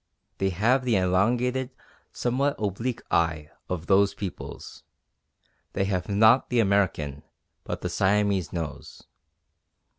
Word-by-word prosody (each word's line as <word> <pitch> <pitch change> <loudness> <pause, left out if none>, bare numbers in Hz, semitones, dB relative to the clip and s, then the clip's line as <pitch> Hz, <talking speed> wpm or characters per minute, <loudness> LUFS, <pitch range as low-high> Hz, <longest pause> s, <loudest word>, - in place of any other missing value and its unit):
They 95 - +1
have 115 +8 +2
the 120 -3 +1
elongated, 120 +8 +1 0.4
somewhat 135 +4 0
oblique 115 +4 -3
eye 80 -3 0 0.2
of 85 -2 -3
those 100 +1 +3
peoples; 95 -3 -7 0.9
they 95 - 0
have 95 -1 -2
not 110 +5 +4
the 125 - +1
American, 95 -9 +1 0.4
but - - -4
the - - -3
Siamese 100 -2 +1
nose. 80 -4 -6
100 Hz, 115 wpm, -26 LUFS, 90-120 Hz, 0.9 s, not